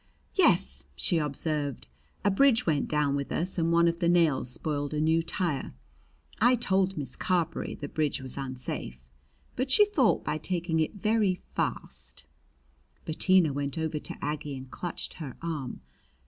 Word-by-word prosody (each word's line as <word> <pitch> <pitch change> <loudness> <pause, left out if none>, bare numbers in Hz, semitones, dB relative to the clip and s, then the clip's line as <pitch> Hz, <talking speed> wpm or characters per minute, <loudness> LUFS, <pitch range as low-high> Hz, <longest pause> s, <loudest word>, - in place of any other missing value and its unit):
"Yes," 65 0 +3
she 165 - +1
observed. 145 - -2 0.4
"A 205 - +5
bridge 250 +3 +4
went 150 -4 +1
down 150 -2 +1
with 140 -1 -3
us 180 +2 0
and 165 0 +2
one 170 0 +5
of 170 0 0
the 170 -2 +2
nails 165 -8 +3
spoiled 145 +2 -3
a - - 0
new 160 +2 +3
tire. 165 - -2 0.7
I 245 +3 +6
told 190 -5 +1
Miss 135 -4 -5
Carberry 170 -3 -1
the 145 - -6
bridge 150 -1 -1
was 130 -1 -7
unsafe, 130 - -5 0.5
but 255 +1 -1
she 415 +10 +7
thought, 295 - +2
by 155 - -1
taking 170 0 -1
it 160 +6 0
very 210 -1 +2 0.2
fast - - -3 0.4
" - - -37
Bettina 170 -1 +3
went 140 +2 -2
over 160 -1 -1
to - - -7
Aggie 150 -1 -3
and 130 0 -10
clutched 175 - -4
her 140 -5 -6
arm. 155 -7 -4
160 Hz, 160 wpm, -28 LUFS, 140-180 Hz, 0.7 s, she